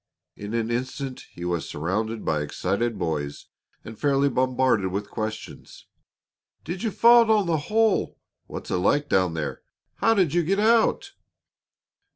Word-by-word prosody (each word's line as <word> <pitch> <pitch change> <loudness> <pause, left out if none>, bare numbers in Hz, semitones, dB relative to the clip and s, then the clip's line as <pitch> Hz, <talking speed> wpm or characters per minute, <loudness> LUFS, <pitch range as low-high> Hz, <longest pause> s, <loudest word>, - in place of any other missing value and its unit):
In 105 +2 -6
an 115 0 -1
instant 130 +2 -4
he 85 - -8
was 85 -2 -2
surrounded 105 +8 -3
by 75 - +1
the 75 - -2
excited 100 +9 -2
boys 75 -4 -3 0.4
and 110 -1 -10
fairly 140 0 +2
bombarded 130 -5 +1
with 100 +2 -4
questions: 110 -1 -7 0.8
"Did 175 +4 -5
you 230 - 0
fall 235 +3 +6
down 215 -3 +3
the 165 -2 +1
hole?" 220 -1 +2 0.3
"What's - - -7
it - - +1
like 145 +11 +1
down 90 -3 +2
there?" 75 -2 -4 0.4
"How 225 0 +3
did 180 -7 +2
you 175 - +3
get 195 +5 0
out?" 230 - +2
125 Hz, 155 wpm, -25 LUFS, -, 0.8 s, fall